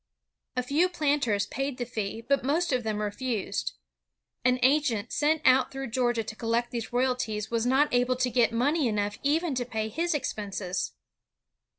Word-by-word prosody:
A 250 - +1
few 300 +8 +2
planters 280 - +1
paid 270 +4 -3
the 245 - -2
fee, 225 -2 -4
but 280 -2 +2
most 305 +3 +1
of 250 - +2
them 215 -2 -2
refused. 215 +1 -2 0.7
An 250 0 +3
agent 255 -5 +2
sent 310 +1 +2
out 260 0 +5
through 270 -3 -5
Georgia 240 -2 +1
to 215 - -7
collect 235 +1 -1
these 235 -2 -4
royalties 245 -4 -1
was 230 0 +1
not 270 +3 +3
able 245 +1 +3
to 250 0 0
get 235 -1 +3
money 275 +5 +2
enough 205 -2 -1
even 310 +2 +1
to 250 -1 -1
pay 220 -2 -3
his 335 +8 -1
expenses. 205 -8 -3
250 Hz, 170 wpm, -28 LUFS, 225-275 Hz, 0.7 s, out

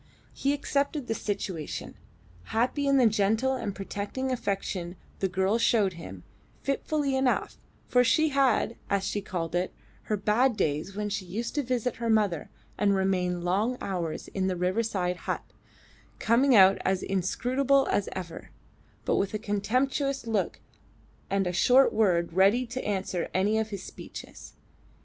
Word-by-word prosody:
He 275 - 0
accepted 285 0 -1
the 225 - -1
situation, 190 -7 -4 0.5
happy 255 +5 0
in 275 0 +4
the 255 - +5
gentle 220 +4 +2
and 205 -6 -3
protecting 205 +7 -4
affection 195 -6 -2 0.2
the 195 - +1
girl 190 +4 +1
showed 220 -5 +3
him, 95 - -9 0.4
fitfully 275 0 0
enough, 265 -1 0 0.3
for 250 0 +4
she 315 +5 +3
had, 265 -5 +2
as 200 -1 +1
she 205 +1 -2
called 170 -4 -4
it, 180 +1 0 0.3
her 215 - 0
bad 215 +4 +2
days 155 +6 -1
when 210 0 -2
she 200 -1 -3
used 215 +7 -4
to 295 - +1
visit 250 -2 -1
her 230 -1 -2
mother 205 -7 +1 0.3
and 200 -1 +3
remain 180 -2 0
long 205 +8 +1
hours 170 -5 -3
in 190 -1 -1
the 185 - 0
riverside 180 0 0
hut, - - -1 0.7
coming 245 +3 +4
out 195 -1 +7
as 190 -1 0
inscrutable 255 +9 +1
as 205 - 0
ever, 180 -3 -7 0.6
but - - +2
with 200 +2 0
a - - +1
contemptuous 250 +6 -1
look 220 -4 -1 0.7
and 195 0 +1
a 180 - -1
short 255 +9 +5
word 175 -6 +2
ready 200 +7 +4
to 250 +2 -5
answer 190 -3 -2
any 205 +4 +2
of 220 0 -2
his 200 -3 -6
speeches. - - -10
205 Hz, 155 wpm, -28 LUFS, 190-250 Hz, 0.7 s, out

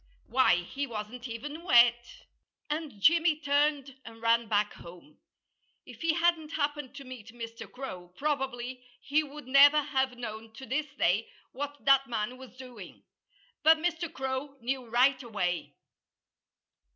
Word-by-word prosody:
Why, 260 -7 +4
he 275 +10 -4
wasn't 235 +2 -6
even 290 +7 -6
wet! 240 -6 +4 0.5
And 300 -8 -4
Jimmy 325 - +4
turned 285 -2 +1
and 225 0 -12
ran 230 0 +2
back 210 0 +1
home. 175 - -14 0.7
If - - -13
he 330 -1 +2
hadn't 330 -2 +1
happened 290 -2 -2
to 280 - -8
meet 255 -5 -10
Mr. 230 -1 -8
Crow, 185 -10 -8
probably 260 -4 -2 0.2
he 295 +2 +1
would 295 -1 -9
never 280 +3 +7
have 265 -3 -1
known 225 -2 -7
to 265 - -9
this 295 +4 -1
day 195 +6 +1 0.2
what 285 +2 -6
that 275 0 +5
man 230 +1 -3
was 255 -1 -13
doing. 245 -7 -11 0.6
But 320 +1 +6
Mr. 340 0 -2
Crow 265 +1 -4
knew 255 +1 -3
right 255 +3 +3
away. 200 -8 -3
260 Hz, 140 wpm, -29 LUFS, 235-290 Hz, 0.7 s, never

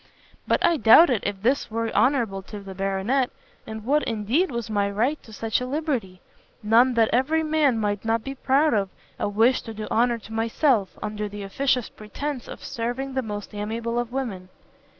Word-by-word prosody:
But - - +2
I 340 - +3
doubted 240 0 +6
if 200 -1 -5
this 260 +5 +1
were 225 0 -2
honourable 235 -8 +2
to 210 - -7
the 195 -1 -9
Baronet, 195 +7 0 0.4
and 220 -1 -7
what, 295 +4 +3
indeed, 230 - 0
was 235 -3 -4
my 205 -2 0
right 240 +9 0
to 225 - -15
such 220 +2 -1
a 250 - -3
liberty? 255 - -3 0.4
none 235 +4 +4
that 225 -1 +3
every 300 +6 +2
man 305 -5 +2
might 205 -2 -1
not 225 0 0
be 270 - -5
proud 280 +3 +2
of, 200 -2 +1 0.3
a - - 0
wish 225 +5 +3
to 225 -2 -9
do 215 0 -5
honour 235 +1 +2
to 225 0 -12
myself, 225 -1 +1
under 210 0 -3
the 205 0 -7
officious 250 +4 0
pretence 255 +5 -6
of - - -9
serving 245 +4 -4
the 260 - 0
most 210 -3 -6
amiable 225 +3 -3
of 240 -1 -3
women." 215 -9 -4
230 Hz, 190 wpm, -24 LUFS, 210-265 Hz, 0.4 s, doubted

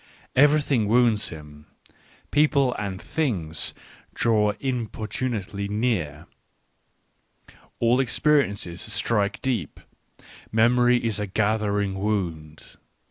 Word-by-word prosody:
Everything 145 -5 +3
wounds 115 -1 +3
him. 75 -2 -11 0.6
People 140 -3 +3
and 100 -2 -4
things 90 - -2 0.4
draw 105 -3 +2
importun 120 0 -3
ately 100 +1 -6
near, 105 -10 -1 1.5
all 120 +2 +3
experiences 120 - +1
strike 105 -1 0
deep, 115 - -2 0.7
memory 120 +2 +4
is 110 -2 0
a 105 - -2
gathering 105 -1 0
wound. 85 -8 -4
110 Hz, 85 wpm, -24 LUFS, 100-125 Hz, 1.5 s, memory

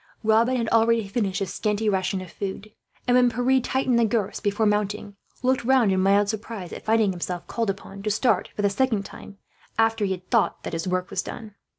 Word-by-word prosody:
Robin 225 +4 +3
had 235 -2 -1
already 230 -1 +3
finished 195 -2 -1
his 195 -3 -3
scanty 215 0 -1
ration 190 -1 0
of 185 - -10
food 200 +1 -6 0.4
and, 245 - +4
when 250 -1 +5
Pierre 250 +3 +2
tightened 255 -1 +1
the - - +4
girths 220 -3 0
before 205 +2 0
mounting, 210 0 -1 0.3
looked 255 0 +2
round 245 -4 +4
in 190 - +2
mild 200 +2 +3
surprise 215 -4 -5
at - - -8
finding 220 -2 +3
himself 175 -1 -4
called 230 -3 -2
upon 195 0 -6
to 210 - -2
start, 215 +4 +1
for 205 - -2
the 200 - +4
second 225 -2 +1
time, 200 0 -11 0.4
after 225 -1 +2
he 200 - +1
had 185 0 -9
thought - - +1
that - - -5
his 165 +2 -3
work 185 0 -1
was - - -1
done. 215 -2 -8
210 Hz, 215 wpm, -24 LUFS, 195-230 Hz, 0.4 s, when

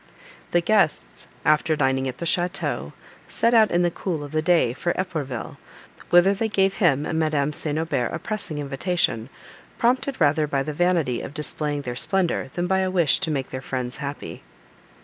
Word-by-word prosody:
The 175 - +2
guests, 195 -4 +1 0.2
after 155 +1 +3
dining 130 -2 +1
at 125 -1 -5
the 170 - -5
château, 175 +2 -1 0.3
set 230 +1 +1
out 220 -2 +6
in 175 +1 +2
the 175 - +2
cool 165 -4 -3
of 145 - -8
the 155 - 0
day 160 -8 +3
for 175 +7 -1
Epourville, 150 -10 -4 0.5
whither 175 +3 +6
they 220 +3 -1
gave 195 -2 +1
him 150 -6 +3
and 160 - -1
Madame 150 -2 +1
St. 150 0 -2
Aubert 145 -6 -1
a - - -2
pressing 205 -4 -3
invitation, 140 -4 -1 0.5
prompted 260 +3 +1
rather 150 -1 +3
by 140 -2 0
the 150 - -4
vanity 165 -7 +1
of 145 - -8
displaying 150 -1 -2
their 125 -2 -4
splendour, 175 -2 0
than 175 - -1
by 190 +1 +1
a 190 0 +1
wish 175 -6 +3
to - - -2
make 135 -4 -2
their 130 - -5
friends 125 -2 -4
happy. 145 -1 -6
155 Hz, 185 wpm, -24 LUFS, 140-180 Hz, 0.5 s, out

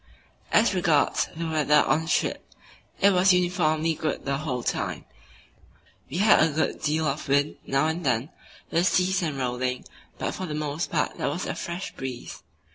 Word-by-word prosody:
As - - +4
regards - - +2
the 165 +1 -4
weather 150 -2 +3
on 155 - +2
the 160 - -7
trip, - - -1 0.5
it 200 - +6
was 185 0 +5
uniformly 165 -3 +1
good 155 -1 -3
the 135 0 0
whole 130 -6 -3
time; - - -2 1.0
we 145 - -4
had 210 +3 +5
a 160 - +4
good 160 +1 -1
deal 155 +1 0
of 145 +1 -2
wind 140 +2 +1
now 135 +2 +2
and 160 +2 -2
then, 125 +1 0 0.4
with 170 +3 +2
seas 185 +1 +2
and 155 -5 -2
rolling, 125 0 -2 0.3
but - - -3
for 185 - -5
the 150 - -4
most 150 +2 -3
part - - -1
there - - 0
was 175 +6 -3
a - - -2
fresh 175 +3 -6
breeze. 130 -2 -7
155 Hz, 180 wpm, -26 LUFS, 140-175 Hz, 1.0 s, it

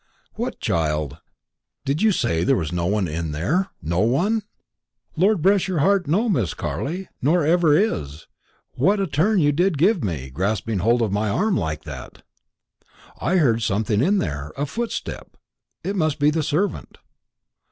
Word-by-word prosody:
"What, - - -4
child?" 75 -3 -1 0.7
"Did 140 +4 -1
you 220 0 +4
say 85 - 0
there - - +3
was 80 -3 -2
no 85 0 -1
one 100 -1 +1
in 80 0 -3
there 160 - 0 0.2
no 85 +3 -1
one?" 175 - +2 0.7
"Lord 185 0 +2
bless 195 0 +3
your 185 -3 -1
heart, 190 +3 +2
no, 200 +11 +2
Miss 120 - 0
Carley, 180 +6 -4
nor 155 +4 +2
ever 160 -2 +4
is. 75 - -1 0.5
What 195 +11 +2
a 195 - +1
turn 190 +7 +1
you 145 -5 +4
did 175 +2 +1
give 185 +4 +3
me, 75 -10 -3
grasping 100 - -1
hold 115 +5 +2
of 105 - -1
my 105 +1 0
arm 200 - +1
like 80 -3 -2
that!" - - -9 1.0
"I 180 - 0
heard 120 -9 +3
something 105 0 0
in 195 +9 +3
there 75 - -3
a 145 - 0
footstep. 230 +10 -5 0.5
It 195 - -2
must 155 -5 0
be 145 0 +3
the 160 +1 0
servant." 155 +7 -2
145 Hz, 165 wpm, -22 LUFS, -, 1.0 s, you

